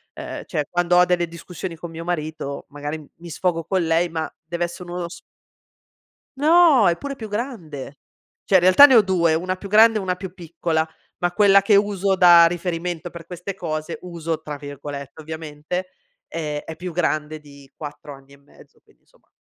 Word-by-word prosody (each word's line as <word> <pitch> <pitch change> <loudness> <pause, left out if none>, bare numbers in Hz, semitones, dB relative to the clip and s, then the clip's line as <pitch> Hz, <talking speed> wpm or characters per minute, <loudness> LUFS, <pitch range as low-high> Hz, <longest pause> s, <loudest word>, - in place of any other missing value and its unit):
uhm, - - -6
cioè 150 -4 -1
quando 175 0 +1
ho 180 - +7
delle 175 -1 +1
discussioni 170 +1 -7
con 165 +1 -9
mio 165 +1 -7
marito, 155 -4 -4
magari 145 +1 -6
mi 170 0 -11
sfogo 165 0 -1
con 190 -3 0
lei 165 +2 +2
ma 160 -1 -3 0.2
dev'essere 175 +1 -4
uno 175 -1 -4
sf 170 0 -11 1.2
No, 305 - +6
è 170 - +2
pure 280 -1 -6
più 220 -4 -8
grande. 175 - -6 0.5
Cioè 195 - -1
in 185 - +8
realtà 185 +11 +9
ne 265 - +4
ho 225 - +8
2 170 -4 +2
una 185 +3 -1
più 200 +1 -9
grande 220 +1 +6
e - - -3
una 185 -2 -2
più 185 -1 -7
piccola 165 -2 -2 0.3
ma 175 0 0
quella 200 0 +5
che 200 0 +4
uso 200 -1 +1
da 175 -2 +8
riferimento 175 0 -3
per 170 -1 -11
queste 180 +2 -6
cose, 155 -4 -4
"uso" 165 -2 -4
tra 150 -2 -6
virgolette 145 0 -8
ovviamente, 160 +3 -5 0.4
eh 150 -3 -4
è 160 - -7
più 180 0 -7
grande 155 -2 -1
di 140 -2 -16
4 145 -1 -8
anni 135 +1 -17
e 140 - -17
mezzo 140 - -21
quindi - - -29
insomma - - -31
170 Hz, 185 wpm, -22 LUFS, 155-185 Hz, 1.2 s, realtà